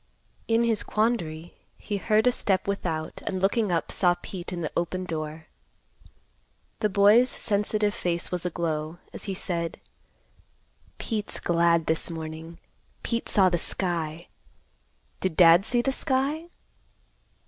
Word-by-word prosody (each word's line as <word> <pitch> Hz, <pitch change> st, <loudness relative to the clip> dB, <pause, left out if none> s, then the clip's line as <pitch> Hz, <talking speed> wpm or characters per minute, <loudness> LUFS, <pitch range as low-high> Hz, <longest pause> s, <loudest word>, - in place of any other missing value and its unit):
In 230 Hz, +1 st, +3 dB
his 225 Hz, -2 st, +1 dB
quandary, 175 Hz, -8 st, -1 dB, 0.2 s
he 205 Hz, -, -4 dB
heard 215 Hz, +3 st, +2 dB
a 250 Hz, -, +5 dB
step 195 Hz, -6 st, 0 dB
without 160 Hz, -5 st, -3 dB
and 190 Hz, -, -1 dB
looking 200 Hz, +1 st, +1 dB
up 170 Hz, -, -1 dB
saw 175 Hz, -2 st, +3 dB
Pete 185 Hz, -2 st, -7 dB
in 175 Hz, -1 st, -4 dB
the 155 Hz, -, -3 dB
open 180 Hz, +2 st, -1 dB
door. 155 Hz, -1 st, -5 dB, 1.3 s
The 210 Hz, -, +1 dB
boy's 210 Hz, +5 st, +5 dB
sensitive 210 Hz, -1 st, 0 dB
face 175 Hz, -6 st, -2 dB
was 180 Hz, -2 st, -2 dB
aglow, 160 Hz, -2 st, -2 dB, 0.2 s
as -, -, -8 dB
he 195 Hz, -2 st, -3 dB
said; 170 Hz, -3 st, -3 dB, 1.2 s
"Pete's 215 Hz, -3 st, -3 dB
glad 170 Hz, -1 st, +2 dB
this 160 Hz, +2 st, 0 dB
morning; 160 Hz, 0 st, -7 dB, 0.5 s
Pete 235 Hz, -1 st, -2 dB
saw 195 Hz, -2 st, +5 dB
the 175 Hz, -1 st, 0 dB
sky. 170 Hz, -2 st, 0 dB, 0.9 s
Did 185 Hz, -4 st, -2 dB
Dad 175 Hz, +3 st, +7 dB
see 240 Hz, -1 st, +2 dB
the 270 Hz, -, +1 dB
sky?" 275 Hz, +4 st, 0 dB
180 Hz, 135 wpm, -26 LUFS, 165-215 Hz, 1.3 s, Dad